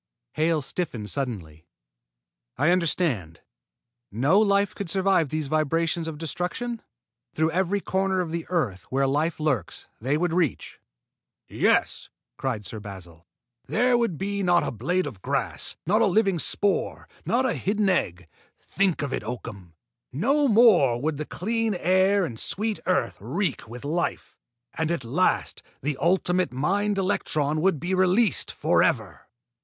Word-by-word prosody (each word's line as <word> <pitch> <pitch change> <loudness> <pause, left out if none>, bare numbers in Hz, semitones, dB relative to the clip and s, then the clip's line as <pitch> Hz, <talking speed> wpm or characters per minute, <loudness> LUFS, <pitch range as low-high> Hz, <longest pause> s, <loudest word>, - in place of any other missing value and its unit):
Hale 155 -1 +1
stiffened 130 - -4
suddenly. 90 - -5 0.9
"I 145 +6 +3
understand. 150 - 0 0.7
No 135 - +3
life 200 -2 +2
could 200 -4 -6
survive 190 -4 +2
these 155 +1 -2
vibrations 165 +2 0
of 160 -2 -5
destruction? 180 - -4 0.5
Through 160 +1 +1
every 190 +3 0
corner 190 0 0
of 175 -3 -2
the 170 0 -4
earth 120 - -1
where 135 +1 +1
life 150 +5 0
lurks, 135 - -2
they 135 +6 0
would 175 0 0
reach?" 170 -5 -1 0.7
"Yes!" - - +1 0.3
cried 120 -6 -3
Sir 110 +4 -6
Basil. 90 -5 -11 0.4
"There 245 +2 +2
would 230 -9 0
be 200 +3 -2
not 175 -2 +3
a - - -2
blade 175 - -1
of 115 -10 -8
grass, - - -3
not 210 +6 +3
a 225 - +5
living 195 -2 +2
spore, 200 +7 -1 0.2
not 255 +2 +1
a 255 - +1
hidden 205 +1 0
egg! 85 - 0 0.3
Think 190 -5 0
of 140 - -3
it, - - -3
Oakham! 100 -7 -7 0.4
No 275 - +2
more 205 - +5
would 150 +2 -1
the 150 - -4
clean 225 +2 -1
air 185 +2 +3
and 115 -8 -6
the - - -5
sweet 215 +1 -1
earth 185 - 0
reek 175 - -2
with 125 +4 -9
life, 165 +4 -2 0.4
and 160 -1 -1
at 170 -6 -1
last 145 +11 0 0.2
the 145 +1 0
ultimate 180 +1 +1
mind 195 +10 0
electron 155 -6 0
would 185 -4 +2
be 175 +5 -2
released 185 +4 +3
forever." - - 0
170 Hz, 150 wpm, -25 LUFS, 135-195 Hz, 0.9 s, a